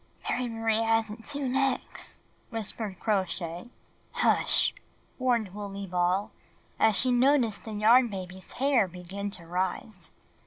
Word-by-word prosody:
"Mary 250 -1 -1
Marie 225 -1 0
hasn't 225 0 0
two 285 -2 0
necks/' 265 0 -2 0.3
whispered 220 -3 -2
Crow 210 -4 +2
Shay. 175 +4 -6 0.5
"Hush!" - - +3 0.5
warned 235 -7 +1
Wooley 200 -1 -6
Ball 180 +2 0 0.5
as 220 -2 +4
she 250 +6 +3
noticed 245 -4 +3
the 220 - -6
Yarn 230 +4 +5
Baby's 185 -3 -7
hair 265 -6 +3
begin 185 +3 -6
to 185 -4 -7
rise. 185 +1 -3
215 Hz, 125 wpm, -28 LUFS, 190-240 Hz, 0.5 s, Yarn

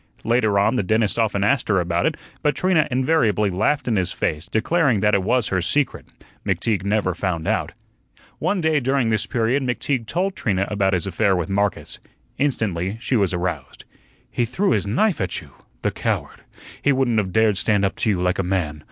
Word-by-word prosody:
Later 115 -3 +2
on, 100 +6 +2
the - - +2
dentist 110 +3 +1
often 105 -3 +1
asked 125 +5 +1
her 100 -3 +3
about 85 0 0
it, - - -2 0.2
but 150 - +1
Trina 185 -4 +2
invariably 125 -6 +2
laughed 110 +11 0
in 115 -3 +1
his 90 -2 0
face, 75 +2 -2
declaring 125 - +1
that 105 +1 +2
it 100 - +3
was 120 +4 +1
her 95 -1 0
secret. 145 - 0 0.4
McTeague 95 +1 0
never 100 -2 0
found 85 -2 -3
out. - - -1 0.7
One 200 -3 0
day 160 -2 +2
during 135 -2 +1
this 110 -2 0
period 120 +4 +1
McTeague 125 -1 -2
told 185 - -1
Trina 100 -2 -1
about 100 -2 +1
his 90 0 0
affair 95 +1 +1
with 90 +1 -2
Marcus. 100 0 -1 0.4
Instantly 105 -8 -1
she 125 - -1
was 100 -6 +2
aroused. 85 -6 -4 0.5
"He 120 - 0
threw 190 - 0
his 100 -2 +1
knife 175 - +1
at 95 - -2
you! - - -15 0.3
The - - +1
coward! - - -3 0.4
He 145 - +3
wouldn't 130 -4 +2
of 95 -3 -2
dared 110 -2 +3
stand 100 -1 +2
up 95 - -1
to - - 0
you 95 -4 +1
like 90 +1 0
a - - +1
man. 90 -5 -2
105 Hz, 195 wpm, -22 LUFS, 95-125 Hz, 0.7 s, her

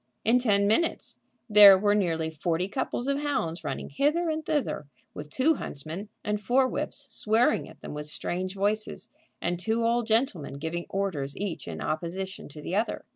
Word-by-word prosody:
In 235 +3 +5
ten 205 -5 +3
minutes 275 +11 0 0.3
there 205 -3 +9
were 205 +1 +2
nearly 165 -6 0
forty 165 +3 -1
couples 245 +3 -3
of 280 0 +1
hounds 180 - -2
running 150 -3 -4
hither 315 - +1
and 315 0 -3
thither, 295 - -1 0.3
with 150 0 -8
two 260 - +3
huntsmen 165 - -6
and 210 -1 -1
four 255 +6 +3
whips - - -2
swearing 220 +3 +1
at - - -16
them - - -7
with 150 0 -5
strange 185 +5 -2
voices, 210 +2 -1 0.3
and 175 0 -1
two 225 +4 0
old 235 0 +1
gentlemen 220 - 0
giving 160 +4 -4
orders 165 -9 -2
each 200 -4 -4
in - - -6
opposition 185 +4 -4
to 150 +1 -10
the 180 - -3
other. 220 +3 -1
200 Hz, 175 wpm, -27 LUFS, 165-235 Hz, 0.3 s, there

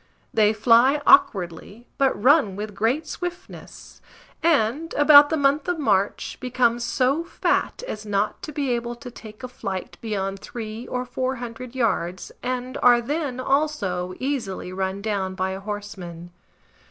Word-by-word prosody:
They 215 -1 +4
fly 235 +6 +4
awkwardly, 205 - +3
but 270 -6 +2
run 255 - +4
with 210 +1 -5
great 240 +10 0
swiftness, 355 +3 -8 0.4
and, 310 -1 +1
about 290 0 +8
the 320 - 0
month 280 +2 +2
of 355 -1 0
March 200 -9 0
become 245 -2 +1
so 265 +6 +1
fat 340 - -1
as 215 - -5
not 205 0 -1
to 305 - -6
be 280 -3 -2
able 240 0 -2
to 245 +1 -10
take 220 0 -12
a - - -3
flight 195 -7 -6
beyond 195 -3 -3
three 225 +1 -7
or 250 0 -3
four 255 +1 -2
hundred 240 +1 -8
yards, 185 -7 -1
and 255 0 -3
are 245 -1 +6
then, 280 +1 -3
also, 240 -11 -1
easily 235 -9 -3
run 190 +1 -3
down 195 -3 -2
by 185 0 -1
a 190 - -5
horseman. 195 -4 -7
235 Hz, 150 wpm, -23 LUFS, 200-275 Hz, 0.4 s, about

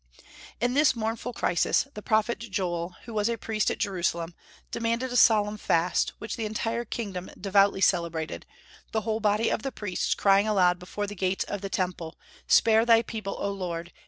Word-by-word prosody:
In 245 +2 +1
this 290 0 +4
mournful 225 +2 -3
crisis 180 +3 +1
the 210 - -7
prophet 220 +2 +1
Joel, 180 -5 -3
who 230 - -9
was 210 +1 +1
a 235 - -1
priest 215 0 -1
at - - -2
Jerusalem, 175 -5 -1 0.4
demanded 235 +2 -1
a - - -3
solemn 215 -3 +4
fast, 170 0 +1
which 215 - -6
the 225 - -2
entire 225 +2 -2
kingdom 195 -7 -5
devoutly 195 0 +3
celebrated, 170 -4 0 0.5
the 220 - +1
whole 220 +1 -1
body 215 +1 +1
of - - -1
the 270 - -3
priests 205 -5 -2
crying 200 +1 +4
aloud 180 -4 +3
before 195 +3 -4
the 205 - -6
gates 190 -1 -1
of 205 - -5
the 195 - -4
Temple, 175 -4 -3 0.3
"Spare 225 0 +5
Thy 230 -1 +5
people, 215 -4 -5
O 200 - -1
Lord! 175 -3 -5
205 Hz, 180 wpm, -27 LUFS, 185-225 Hz, 0.5 s, Spare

